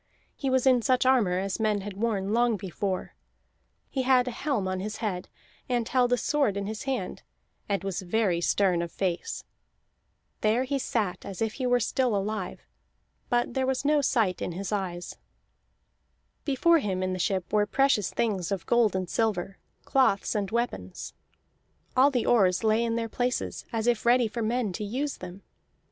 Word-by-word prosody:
He 270 Hz, -, -2 dB
was 260 Hz, 0 st, +2 dB
in 255 Hz, -2 st, +5 dB
such 255 Hz, +2 st, +2 dB
armor 230 Hz, -9 st, +3 dB
as 195 Hz, +2 st, -2 dB
men 215 Hz, -2 st, +1 dB
had 205 Hz, +1 st, -6 dB
worn 205 Hz, -2 st, -1 dB
long 235 Hz, -1 st, +3 dB
before; 190 Hz, 0 st, -3 dB, 0.7 s
he 265 Hz, -, -2 dB
had 255 Hz, -1 st, +4 dB
a -, -, -1 dB
helm 235 Hz, -5 st, -1 dB
on 185 Hz, 0 st, -2 dB
his 210 Hz, +3 st, -4 dB
head, 190 Hz, -5 st, -3 dB, 0.4 s
and 240 Hz, -2 st, 0 dB
held 250 Hz, -1 st, +2 dB
a 245 Hz, -, +4 dB
sword 275 Hz, -8 st, +1 dB
in 200 Hz, -, -2 dB
his 215 Hz, +3 st, -5 dB
hand, 270 Hz, -2 st, -3 dB, 0.5 s
and 200 Hz, -1 st, 0 dB
was 195 Hz, 0 st, -3 dB
very 185 Hz, -2 st, +1 dB
stern 180 Hz, -1 st, +2 dB
of 170 Hz, -1 st, -4 dB
face. 180 Hz, -3 st, -2 dB, 1.0 s
There 220 Hz, +4 st, +2 dB
he 275 Hz, +1 st, -1 dB
sat 215 Hz, -8 st, -1 dB
as 195 Hz, -3 st, -7 dB
if 225 Hz, -1 st, 0 dB
he 255 Hz, -, -2 dB
were 245 Hz, 0 st, +3 dB
still 245 Hz, 0 st, +1 dB
alive, 200 Hz, -1 st, -3 dB, 0.7 s
but 240 Hz, -1 st, +1 dB
there 260 Hz, 0 st, 0 dB
was 265 Hz, +1 st, -1 dB
no 295 Hz, 0 st, +4 dB
sight 220 Hz, -8 st, +1 dB
in 175 Hz, -, -3 dB
his 195 Hz, +4 st, -5 dB
eyes. 180 Hz, -4 st, -3 dB, 1.3 s
Before 325 Hz, +4 st, +4 dB
him 190 Hz, -7 st, -2 dB
in 185 Hz, 0 st, -1 dB
the 185 Hz, -, -4 dB
ship 185 Hz, 0 st, -1 dB
were 210 Hz, -1 st, +3 dB
precious 270 Hz, -6 st, +2 dB
things 200 Hz, -7 st, -1 dB
of 195 Hz, -3 st, -2 dB
gold 235 Hz, -5 st, +3 dB
and 185 Hz, -1 st, -1 dB
silver, 195 Hz, -3 st, -1 dB, 0.3 s
cloths, 255 Hz, -7 st, +2 dB
and 205 Hz, -2 st, -1 dB
weapons. 220 Hz, -, -3 dB, 0.8 s
All 265 Hz, +2 st, +6 dB
the 250 Hz, -4 st, 0 dB
oars 195 Hz, -4 st, +3 dB
lay 220 Hz, +1 st, +3 dB
in 230 Hz, -1 st, 0 dB
their 230 Hz, 0 st, -1 dB
places 245 Hz, +2 st, -2 dB
as 225 Hz, -2 st, -1 dB
if 240 Hz, -2 st, +2 dB
ready 240 Hz, 0 st, +4 dB
for 230 Hz, +2 st, -4 dB
men 225 Hz, -2 st, 0 dB
to 210 Hz, -, -4 dB
use 265 Hz, +8 st, -2 dB
them. 185 Hz, +2 st, -9 dB
220 Hz, 180 wpm, -27 LUFS, 195-250 Hz, 1.3 s, All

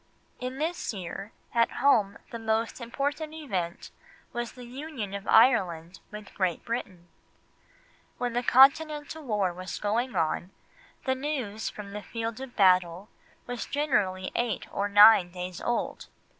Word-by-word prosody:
In 255 Hz, +1 st, -5 dB
this 315 Hz, -6 st, -2 dB
year, 195 Hz, +3 st, -6 dB, 0.2 s
at 230 Hz, -1 st, +2 dB
home 220 Hz, -7 st, +3 dB
the 230 Hz, -, -5 dB
most 225 Hz, +2 st, -1 dB
important 290 Hz, +6 st, -3 dB
event 190 Hz, -, -4 dB, 0.4 s
was 240 Hz, -1 st, -4 dB
the 250 Hz, -1 st, -11 dB
Union 255 Hz, -5 st, -6 dB
of 200 Hz, 0 st, -6 dB
Ireland 185 Hz, -8 st, +3 dB
with 210 Hz, -1 st, -10 dB
Great 185 Hz, -4 st, -1 dB
Britain. 185 Hz, -7 st, -5 dB, 1.1 s
When 245 Hz, -1 st, -2 dB
the 245 Hz, -, +1 dB
Continental 295 Hz, +4 st, +4 dB
war 205 Hz, -8 st, 0 dB
was 185 Hz, 0 st, -6 dB
going 235 Hz, +5 st, -1 dB
on, 165 Hz, +2 st, 0 dB, 0.6 s
the 260 Hz, -, +2 dB
news 260 Hz, -6 st, -3 dB
from 205 Hz, -1 st, -9 dB
the 210 Hz, +1 st, -6 dB
field 230 Hz, +2 st, -5 dB
of 265 Hz, -2 st, -8 dB
battle 185 Hz, -1 st, +3 dB, 0.4 s
was 245 Hz, -1 st, -5 dB
generally 205 Hz, -11 st, 0 dB
eight 235 Hz, -5 st, -1 dB
or 200 Hz, +1 st, -1 dB
nine 205 Hz, -3 st, +8 dB
days 180 Hz, 0 st, -6 dB
old. 240 Hz, -, -2 dB
225 Hz, 140 wpm, -28 LUFS, 190-260 Hz, 1.1 s, nine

